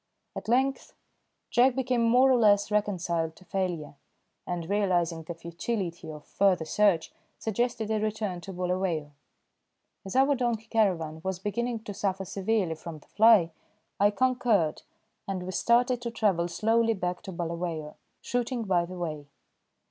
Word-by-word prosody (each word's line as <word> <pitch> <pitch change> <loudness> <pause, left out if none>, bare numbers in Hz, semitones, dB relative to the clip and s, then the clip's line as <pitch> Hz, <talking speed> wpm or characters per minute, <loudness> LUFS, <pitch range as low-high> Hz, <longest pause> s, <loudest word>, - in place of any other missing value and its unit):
At - - -6
length, 265 +4 +1 0.6
Jack 245 +1 +4
became 255 -2 0
more 250 +3 +5
or - - +5
less 205 -2 +4
reconciled 175 -6 0
to 185 - -18
failure, 180 -6 -3 0.5
and 175 -2 -3
realising 180 -5 +1
the 165 +2 -7
futility 170 0 -4
of 150 -1 -10
further 190 -4 +2
search 195 -2 +2 0.2
suggested 225 0 -1
a 215 - +1
return 210 -4 -2
to 195 - -8
Bulawayo. 180 -4 -2 0.9
As 195 - -7
our 270 +2 +5
donkey 240 -4 -1
caravan 175 -9 0
was 190 -1 -2
beginning 225 +4 -2
to 210 - -6
suffer 195 -1 -2
severely 195 -2 0
from 160 0 -8
the 150 - -20
fly, 215 -6 +5 0.5
I 205 +1 +5
concurred, 225 -7 +1 0.5
and 190 -2 -3
we 185 - -5
started 240 +5 +2
to 240 - -3
travel 200 -7 +1
slowly 225 +5 +2
back 180 -2 -3
to 190 - -8
Bulawayo, 170 -3 -4 0.3
shooting 245 0 -1
by 180 -4 +1
the 180 +1 -9
way. 155 -4 -4
195 Hz, 150 wpm, -28 LUFS, 170-225 Hz, 0.9 s, more